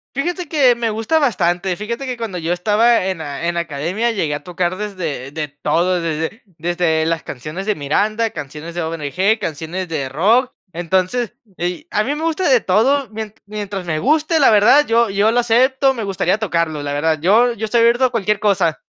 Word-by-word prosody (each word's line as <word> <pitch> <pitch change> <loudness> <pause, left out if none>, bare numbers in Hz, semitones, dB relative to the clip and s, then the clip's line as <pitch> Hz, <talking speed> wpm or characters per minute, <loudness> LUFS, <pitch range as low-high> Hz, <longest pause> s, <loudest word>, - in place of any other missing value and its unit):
Fíjate 345 +4 -2
que 270 -6 +4
me 235 -1 -1
gusta 225 +9 +1
bastante, 185 - 0
fíjate 235 +7 -5
que 255 -1 -3
cuando 225 -6 -5
yo 165 +1 -1
estaba 210 +4 +2
en 190 - -2
la 150 0 -5
en 175 - -3
la 170 - 0
academia 170 +9 -2
llegué 165 -9 -1
a 145 - -6
tocar 180 0 -2
desde 170 -10 -5
de 150 -2 -4
todo, 170 +5 0
desde 160 +6 -3 0.2
desde 165 -1 0
las 165 0 -1
canciones 155 +9 -6
de 210 0 0
Miranda, 210 +10 0
canciones 150 +1 -8
de 175 - -2
ONG, 165 +7 0
canciones 165 +4 -4
de 145 -5 -2
rock. 220 - +2 0.2
Entonces 185 +7 -1 0.2
y, 180 - -3
a 210 - +1
mí 285 - -1
me 310 - -5
gusta 330 +3 0
de 250 -5 +5
todo, 255 +8 +2
mien 215 -1 -6
mientras 200 -3 -5
me 155 -2 -1
guste, 310 - +2
la 275 - +6
verdad, 225 +8 +6
yo 230 -1 +3
yo 200 +3 +2
lo 245 - +3
acepto, 260 +3 +3
me 230 -4 -4
gustaría 190 0 0
tocarlo, 170 -7 -1
la 145 0 -3
verdad. 155 +1 0
Yo 220 +9 +4
yo 225 -2 -4
estoy 230 +2 +2
abierto 235 +3 +4
a 255 - +2
cualquier 210 -3 0
cosa. 190 -7 +1
195 Hz, 200 wpm, -18 LUFS, 165-235 Hz, 0.2 s, la